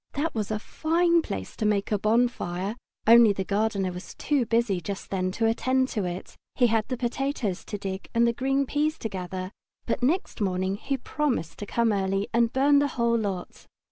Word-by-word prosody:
That 300 +4 -1
was 215 -2 -2
a 215 - 0
fine 335 +8 +2
place 95 - -6
to - - -3
make 210 -1 +1
a 210 - +2
bonfire, 215 -3 0 0.3
only 230 -2 +7
the 195 - -2
gardener 200 -2 0
was 180 +1 -9
too 280 -6 0
busy 230 -5 +1
just 195 +3 -6
then 185 -1 0
to 225 - 0
attend 260 +3 +2
to 210 -5 -2
it. 180 +1 -6 0.2
He 250 - +4
had 220 -1 +1
the 255 0 -3
potatoes 240 -5 -2
to 205 - -4
dig 195 -1 -5
and 235 0 +3
the 235 - +2
green 270 +3 +1
peas 300 +3 0
to 225 - -4
gather, 185 -1 -5 0.3
but 235 - -1
next 285 - 0
morning 190 0 0
he 275 +5 -2
promised 260 - -2
to 205 - -6
come 235 +2 +1
quite 200 -2 +1
early 195 +1 0
and 235 0 +3
burn 280 +2 +4
the 285 - +2
whole 235 -1 +2
lot. 200 -5 -4
225 Hz, 205 wpm, -26 LUFS, 195-255 Hz, 0.3 s, only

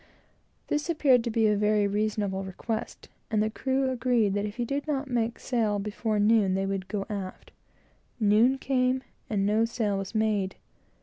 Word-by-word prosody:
This 295 +2 -2
appeared 275 -7 +4
to - - 0
be 225 0 +2
a 210 -1 +4
very 210 0 +2
reasonable 205 -1 -1
request, 220 +4 -5 0.2
and 215 -1 +2
the 215 - -1
crew 265 +3 0
agreed 235 -5 +1
that 205 +1 -1
if 205 - -8
he 240 -1 -2
did 280 +5 -3
not 280 -2 -2
make 235 -1 0
sail 225 -5 0
before 210 +2 -2
noon, 205 -2 +3
they 195 0 0
would 195 -1 -3
go 195 0 -3
aft. 195 -3 -6 0.7
Noon 220 +5 +4
came, 260 -1 +1 0.3
and 200 -3 0
no 215 +2 +3
sail 220 -4 -1
was 195 +3 -6
made. 210 -3 +1
215 Hz, 175 wpm, -27 LUFS, 205-245 Hz, 0.7 s, appeared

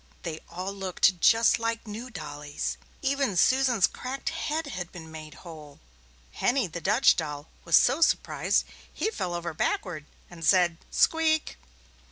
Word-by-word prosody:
They 160 -2 -5
all 185 +3 -5
looked 190 -1 +1
just 230 0 +5
like 230 0 -2
new 225 +4 -7
dollies. 150 -6 -5 0.3
Even 270 -7 0
Susan's 250 +1 +4
cracked 270 +4 -4
head 320 0 -2
had 185 -11 -6
been 160 -2 -10
made 155 -1 -9
whole. 155 -4 -11 0.5
Henny, 255 -1 +1
the 170 -1 -7
Dutch 220 +9 +4
doll, 150 -2 -5 0.2
was 170 -2 +4
so 265 +6 +3
surprised - - +2 0.3
he 435 - -2
fell 180 - -3
over 170 -1 -4
backward 155 -1 -2 0.2
and 170 -2 -11
said, 175 -1 +3
"Squeek!" 320 -1 +2
185 Hz, 145 wpm, -27 LUFS, 165-255 Hz, 0.5 s, just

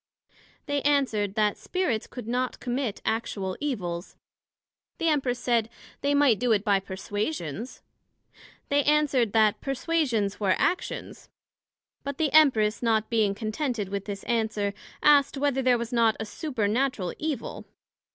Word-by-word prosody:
They 285 -1 -1
answered, 230 -9 +1
That 210 -2 +2
Spirits 355 - -1
could 245 -4 -8
not 250 +1 -1
commit 245 -3 -3
actual 200 -4 -2
evils. 180 -11 -4 0.8
The 330 - +1
Empress 265 -5 +1
said, 235 -3 +1 0.3
they 285 0 +2
might 280 -7 +4
do 245 -1 +1
it 205 -2 +1
by 200 -3 +3
perswasions. 205 - -4 0.9
They 285 0 +3
answered, 285 -7 +3
That 215 -2 +3
Perswasions 270 -7 0
were 195 -3 +2
actions; 365 - -2 0.7
But 280 0 -4
the 310 -3 0
Empress 230 -9 +5
not 225 -2 +1
being 215 -3 +2
contented 220 -1 -2
with 200 0 -4
this 200 -2 -6
answer, 220 -3 -1 0.3
asked, 285 -2 +5
Whether 275 -1 +1
there 250 -1 +4
was 235 0 -5
not 230 -2 +3
a 220 - -3
supernatural 230 - -1
Evil? 305 -6 -4
235 Hz, 135 wpm, -27 LUFS, 210-280 Hz, 0.9 s, Empress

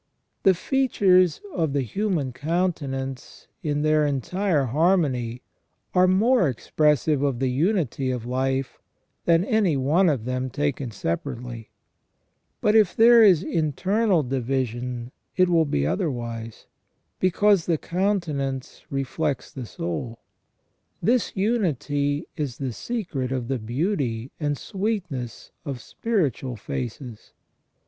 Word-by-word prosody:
The 190 -2 +5
features 185 - +3
of 160 -5 0
the 140 -2 +1
human 165 - -1
countenance 140 -5 -3
in 150 -2 -1
their 155 0 +3
entire 150 - 0
harmony 130 -5 +1 0.5
are 185 0 +5
more 200 - +4
expressive 150 +3 +1
of 140 -4 +1
the 130 0 0
unity 145 - 0
of 125 -3 -3
life 130 +2 -1 0.5
than 170 +2 +4
any 205 -9 +2
one 160 +8 +3
of 130 -7 -1
them 130 +1 -2
taken 140 -1 -2
separately; 115 - -4 0.9
but 210 - +3
if 215 -5 +4
there 235 +1 +7
is 185 -5 +6
internal 185 - +1
division 125 -1 -2 0.3
it 185 -1 +4
will 165 -2 +4
be 70 - 0
otherwise, 115 - -3 0.5
because 190 0 +3
the 165 -2 +2
countenance 155 -9 -2
reflects 140 +2 -2
the 130 -4 -7
soul. 95 +9 -4 0.8
This 240 +1 +1
unity 150 - 0
is 145 -7 -3
the 130 -4 -3
secret 170 - -3
of 125 -3 -3
the 135 -2 -1
beauty 125 - -2
and 145 -2 -1
sweetness 180 - -4
of 140 -5 -5
spiritual 140 - -2
faces. 125 -1 -6
145 Hz, 115 wpm, -24 LUFS, 125-185 Hz, 0.9 s, there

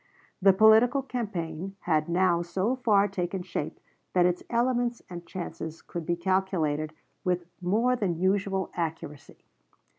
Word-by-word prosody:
The 195 +1 +7
political 220 +7 +5
campaign 195 -8 -4
had 155 -1 +1
now 175 -1 +3
so 190 +8 -1
far 210 -6 +3
taken 185 -1 -3
shape 170 -5 -4 0.3
that 180 -1 +4
its 180 0 +1
elements 240 0 0
and 170 -1 -8
chances 165 -3 -6
could 170 -2 -6
be 175 - +1
calculated 170 -4 0 0.3
with 180 -1 0 0.2
more 225 +8 +2
than 190 -8 -1
usual 190 +1 0
accuracy. 155 -4 -5
185 Hz, 130 wpm, -28 LUFS, 170-205 Hz, 0.3 s, The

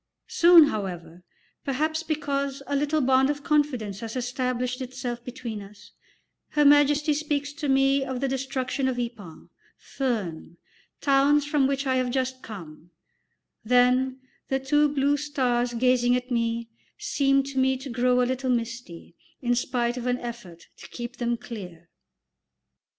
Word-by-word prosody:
Soon, 335 -3 +7
however, 175 -6 -5 0.4
perhaps 310 +4 -1
because 280 -3 -2
a 285 - -2
little 295 +2 +1
bond 265 +1 +3
of 290 -1 -3
confidence 285 - 0
has 225 +1 -6
established 250 0 -2
itself 250 -2 -5
between 240 -4 -6
us, 200 +1 -14 0.6
Her 295 -1 +2
Majesty 290 +1 +5
speaks 290 -1 -2
to 295 -1 -4
me 270 0 +3
of 260 -2 -4
the 275 - 0
destruction 265 0 -2
of 255 -2 -1
Ypres, 225 -9 -6 0.3
Furnes, 195 - -4 0.4
towns 280 +1 +3
from 295 -2 +2
which 275 0 -1
I 260 -1 +1
have 255 -1 0
just 260 0 -2
come; 170 -6 -10 0.7
then 250 +2 +3 0.3
the 265 - 0
two 295 +3 +2
blue 285 0 +1
stars 250 -5 -1
gazing 245 0 +3
at 250 +1 -4
me 230 -1 -1 0.3
seem 275 -10 +2
to 270 -1 -3
me 265 0 +2
to 265 +2 -9
grow 250 +1 +2
a - - +2
little 260 +1 -2
misty, 230 -8 -4 0.3
in 245 -2 0
spite 240 0 -1
of 250 0 -4
an 250 0 +1
effort 230 -9 -9
to - - -12
keep 240 +1 -7
them 240 -1 -1
clear. 180 -8 -9
255 Hz, 150 wpm, -26 LUFS, 240-280 Hz, 0.7 s, Soon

